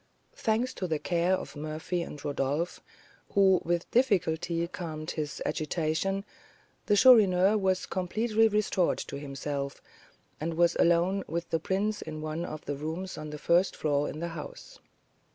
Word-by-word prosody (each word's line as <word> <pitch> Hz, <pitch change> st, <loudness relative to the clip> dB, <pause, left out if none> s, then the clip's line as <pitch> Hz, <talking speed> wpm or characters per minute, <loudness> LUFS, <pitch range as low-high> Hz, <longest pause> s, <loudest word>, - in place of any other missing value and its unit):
Thanks 230 Hz, +4 st, 0 dB
to 185 Hz, -, -3 dB
the 160 Hz, -2 st, 0 dB
care 175 Hz, +3 st, +1 dB
of -, -, -7 dB
Murphy 155 Hz, +4 st, -3 dB
and 150 Hz, -3 st, -7 dB
Rodolph, 145 Hz, +4 st, -1 dB, 0.5 s
who 190 Hz, -2 st, +5 dB
with 170 Hz, +1 st, -1 dB
difficulty 170 Hz, -8 st, +1 dB
calmed 160 Hz, -3 st, -5 dB
his 150 Hz, -2 st, -4 dB
agitation, 165 Hz, +5 st, -1 dB, 0.6 s
the 205 Hz, -, +4 dB
Chourineur 205 Hz, -5 st, +6 dB
was 190 Hz, -1 st, +1 dB
completely 215 Hz, +4 st, +1 dB
restored 210 Hz, -4 st, +1 dB
to 140 Hz, -, -6 dB
himself, 140 Hz, 0 st, -4 dB, 0.6 s
and 160 Hz, +2 st, -3 dB
was 170 Hz, 0 st, +3 dB
alone 175 Hz, +3 st, +3 dB
with 170 Hz, +1 st, -4 dB
the 165 Hz, -, +2 dB
prince 200 Hz, +5 st, -1 dB
in 155 Hz, -1 st, -6 dB
one 155 Hz, +2 st, -3 dB
of 155 Hz, -3 st, -7 dB
the 145 Hz, -1 st, -3 dB
rooms 165 Hz, +6 st, -4 dB
on 155 Hz, 0 st, -7 dB
the 150 Hz, -, -6 dB
first 175 Hz, +5 st, +2 dB
floor 145 Hz, -1 st, 0 dB
in -, -, -6 dB
the 170 Hz, +1 st, -3 dB
house. 165 Hz, -3 st, -9 dB
170 Hz, 150 wpm, -29 LUFS, 155-190 Hz, 0.6 s, Chourineur